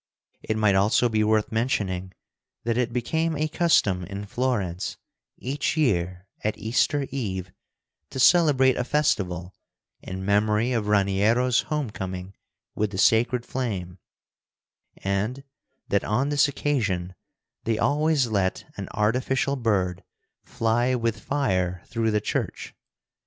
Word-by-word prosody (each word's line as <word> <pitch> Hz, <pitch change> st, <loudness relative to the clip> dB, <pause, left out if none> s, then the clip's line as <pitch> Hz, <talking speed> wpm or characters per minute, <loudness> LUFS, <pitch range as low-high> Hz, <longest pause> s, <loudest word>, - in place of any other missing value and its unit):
It 110 Hz, -, -2 dB
might 105 Hz, -2 st, +3 dB
also 105 Hz, +5 st, +3 dB
be 110 Hz, -1 st, +1 dB
worth 110 Hz, 0 st, +2 dB
mentioning 100 Hz, -6 st, -1 dB, 0.5 s
that 115 Hz, 0 st, 0 dB
it 120 Hz, 0 st, 0 dB
became 160 Hz, +7 st, -1 dB
a 155 Hz, +2 st, 0 dB
custom 150 Hz, -, +2 dB
in 100 Hz, +3 st, -6 dB
Florence, 100 Hz, -6 st, -2 dB, 0.4 s
each 145 Hz, +5 st, -2 dB
year 90 Hz, -, 0 dB, 0.2 s
at 105 Hz, -, -1 dB
Easter 135 Hz, +5 st, +1 dB
Eve, 95 Hz, -9 st, -3 dB, 0.6 s
to 130 Hz, -, -6 dB
celebrate 135 Hz, -4 st, +5 dB
a 125 Hz, -, 0 dB
festival 95 Hz, -, 0 dB, 0.5 s
in 95 Hz, 0 st, -6 dB
memory 105 Hz, +4 st, +2 dB
of 115 Hz, -4 st, -1 dB
Raniero's 105 Hz, +5 st, +3 dB
home 150 Hz, -7 st, -1 dB
coming 95 Hz, -1 st, -6 dB, 0.4 s
with 105 Hz, 0 st, 0 dB
the 95 Hz, -, -6 dB
sacred 120 Hz, +4 st, +3 dB
flame, 95 Hz, -8 st, -4 dB, 1.0 s
and 105 Hz, +8 st, -2 dB, 0.5 s
that, 100 Hz, -, +2 dB
on 125 Hz, +7 st, 0 dB
this 145 Hz, 0 st, +4 dB
occasion, 105 Hz, -11 st, -1 dB, 0.5 s
they 115 Hz, -1 st, +1 dB
always 150 Hz, 0 st, +2 dB
let 100 Hz, -5 st, -1 dB
an -, -, -5 dB
artificial 130 Hz, +6 st, +1 dB
bird 100 Hz, -8 st, 0 dB, 0.4 s
fly 120 Hz, +3 st, 0 dB
with 115 Hz, -2 st, -1 dB
fire 95 Hz, -, -1 dB
through 115 Hz, -1 st, -1 dB
the 105 Hz, -1 st, +2 dB
church. -, -, -3 dB
110 Hz, 125 wpm, -25 LUFS, 95-130 Hz, 1.0 s, celebrate